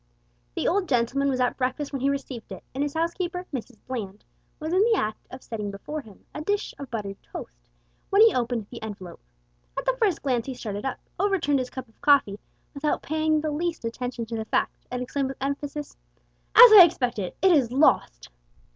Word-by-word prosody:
The - - -1
old 370 -2 +1
gentleman 265 +3 +1
was 260 -1 -1
at 250 -1 +1
breakfast 265 +3 -2
when 270 - -3
he 275 - +2
received 275 -4 -5
it, - - -8
and 270 - -3
his 290 0 -2
housekeeper, 350 +2 -2
Mrs 245 -2 -6
Bland, 215 -6 -6 0.3
was 315 +2 -3
in 375 - +4
the 450 +1 +4
act 215 - -3
of 255 - -10
setting 210 -3 -4
before 295 +10 -6
him 210 -7 -17
a 300 - -5
dish 405 +6 -1
of 280 -3 -7
buttered 200 -4 -5
toast - - -10 0.4
when 400 +2 +6
he 455 - +6
opened 240 -3 -1
the 240 - -8
envelope. 200 -5 -8 0.6
At - - -2
the - - +2
first 390 -7 +1
glance 250 -4 0
he 265 - -4
started 210 -2 -5
up, 265 - -2 0.2
overturned 355 -9 +2
his 255 -1 -3
cup 260 -2 -7
of 225 - -29
coffee, 280 - +4 0.3
without 295 +1 -1
paying 310 0 +1
the 310 0 -2
least 330 -2 -2
attention 240 0 -4
to 230 +1 -5
the 220 -1 -3
fact, - - -1
and 250 0 -3
exclaimed 270 +1 -2
with 270 - -7
emphasis 285 +2 -4 0.6
"As 480 0 +11
I 415 - +12
expected. 245 - 0
It 380 - +6
is 270 -8 +3
lost!" 250 - +2
270 Hz, 200 wpm, -25 LUFS, 230-310 Hz, 0.6 s, I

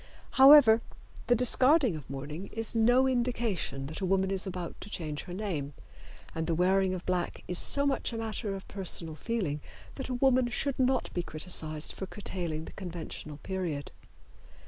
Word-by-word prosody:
However, 265 -4 +8 0.5
the 245 - +5
discarding 255 - +4
of 150 -4 -9
mourning 145 +7 -6
is 225 0 -3
no 245 +3 +4
indication 235 - -1
that 155 +7 -6
a - - 0
woman 190 0 +1
is 195 0 -1
about 180 -2 -5
to 205 - -9
change 155 -6 -5
her - - -9
name, 165 -9 -4 0.6
and 160 0 -3
the 165 - +1
wearing 185 +2 +2
of 180 - -8
black 180 -1 -2
is 180 - 0
so 280 0 +4
much 275 -3 0
a 230 - -5
matter 220 -2 -3
of 190 - -9
personal 180 -4 -1
feeling 155 -4 -3 0.3
that 270 - -6
a 250 - -1
woman 255 -1 +3
should 270 +2 -2
not 260 -1 +1
be 175 - -1
criticised 155 -2 -2
for 190 - -6
curtailing 170 -6 -4
the - - -10
conventional 170 -5 -7
period. 175 -7 -4
190 Hz, 170 wpm, -30 LUFS, 165-240 Hz, 0.6 s, However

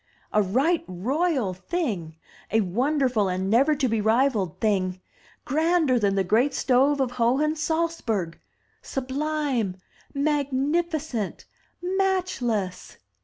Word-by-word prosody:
"A 210 - +4
right 265 - +1
royal 250 - 0
thing! 190 - -3 0.3
A 225 - +3
wonderful 245 - +1
and 185 +2 -1
never 275 +7 +4
to 275 -2 +1
be 225 -2 0
rivalled 220 - +1
thing! 185 -4 0 0.5
Grander 315 -3 +2
than 200 -2 +1
the 195 - +2
great 230 +9 +2
stove 275 +3 +3
of 260 -2 0
Hohen 255 +6 +1
Salzburg! 305 - -1 0.4
Sub 260 -1 -5
lime! 280 -9 -1 0.4
magnificent! 285 - -1 0.4
matchless!" 360 - -1
260 Hz, 110 wpm, -25 LUFS, 205-305 Hz, 0.5 s, A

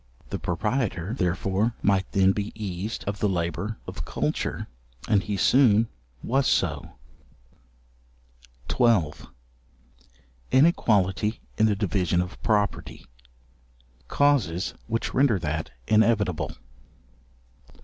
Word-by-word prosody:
The - - -3
proprietor, 105 0 -2
therefore, 95 +2 0
might 95 -1 +1
then 95 -1 +4
be 100 +1 -3
eased 105 0 -4
of 100 0 -4
the 105 - +1
labour 90 +4 -2
of - - -6
culture, - - -2 0.4
and 105 -3 +3
he 100 0 -3
soon 115 -2 +4 0.3
was 135 +3 +1
so. - - 0 1.7
§12. 95 - +1 1.2
Inequality 110 - +2 0.2
in 110 - +5
the 105 - +1
division 95 -3 0
of 90 0 -4
property: 105 -2 -1 1.0
causes 125 -12 +1
which 115 0 -2
render 130 -5 +3
that 80 -2 -3 0.2
inevitable. 105 -5 +2
105 Hz, 100 wpm, -25 LUFS, 95-115 Hz, 1.7 s, in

